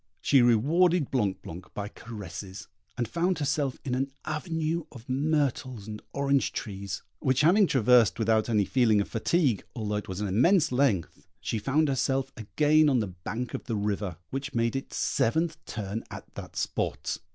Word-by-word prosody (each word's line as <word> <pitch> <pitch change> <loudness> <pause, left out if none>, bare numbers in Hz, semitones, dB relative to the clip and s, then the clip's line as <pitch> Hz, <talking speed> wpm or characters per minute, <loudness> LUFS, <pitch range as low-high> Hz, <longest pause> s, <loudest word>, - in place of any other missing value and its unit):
She 135 - +4
rewarded 150 +8 +3
Blanc 105 -8 0
blanc 85 +3 -8
by 100 0 -3
caresses, 95 -4 -8 0.3
and 120 -2 -1
found 175 - 0
herself 145 -2 0
in 130 - -2
an 135 +2 0 0.2
avenue 160 +1 -2
of 120 -2 -12
myrtles 130 -5 -1
and 105 -1 -7
orange 140 -1 +1
trees, 100 -2 -5 0.2
which 130 +1 +2
having 185 +6 +5
traversed 125 -5 +4
without 110 0 +2
any 105 -3 +3
feeling 115 -4 +3
of 100 - 0
fatigue, 125 - +1
although 105 -3 -2
it 105 - -5
was 95 0 -5
an 105 - -1
immense 145 - +3
length, 125 - 0
she 110 - -2
found 145 +8 +2
herself 135 0 0
again 150 +7 +3
on 135 - +3
the 105 -4 -2
bank 115 +8 -5
of - - -5
the 115 - -2
river, 100 -4 -2
which 135 +1 -4
made 115 +1 +1
its 135 - -4
seventh 160 +6 0
turn 105 0 -4
at - - -10
that - - -9
spot. - - -2
125 Hz, 170 wpm, -28 LUFS, 105-145 Hz, 0.3 s, having